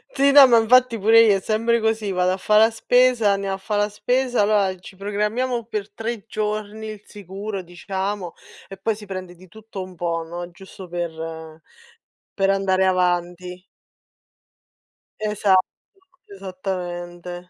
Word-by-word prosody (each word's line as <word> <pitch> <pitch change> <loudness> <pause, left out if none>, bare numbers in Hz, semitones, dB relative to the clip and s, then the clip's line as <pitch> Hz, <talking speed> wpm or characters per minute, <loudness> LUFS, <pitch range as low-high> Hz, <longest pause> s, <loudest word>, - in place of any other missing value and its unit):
Sì, 280 +1 +4
no 275 -1 +9
ma 240 -2 +5
infatti 240 +1 +4
pure 225 +3 +6
io 210 -3 +5
è - - -7
sempre 230 +3 +1
così, 220 -2 -1
vado 180 0 +1
a 185 - -1
fa' 210 +2 +2
la 220 +1 +6
spesa, 245 -1 +3
andiamo 195 -1 -1
a - - -8
fa' 210 +2 -4
la 205 0 +1
spesa, 245 +3 0
allora 200 -2 +2
ci 185 - -13
programmiamo 210 +5 -2
per 215 -3 -5
3 225 -2 -5
giorni 215 0 -4
il 215 -2 -8
sicuro 200 0 -7
diciamo 190 +1 -5 0.3
e 195 - -10
poi 215 +3 -1
si 210 0 -11
prende 185 -2 -7
di 185 +2 -17
tutto 215 +1 -9
un 185 0 -12
po', 170 -1 -2
no, 175 +1 -7
giusto 190 +1 -12
per 160 -2 -6 0.7
per 195 -1 +1
andare 190 -1 +2
avanti. 180 0 -1 1.6
Esatto, 205 -3 +2 0.6
esattamente. 180 -2 -6
195 Hz, 150 wpm, -22 LUFS, 180-220 Hz, 1.6 s, no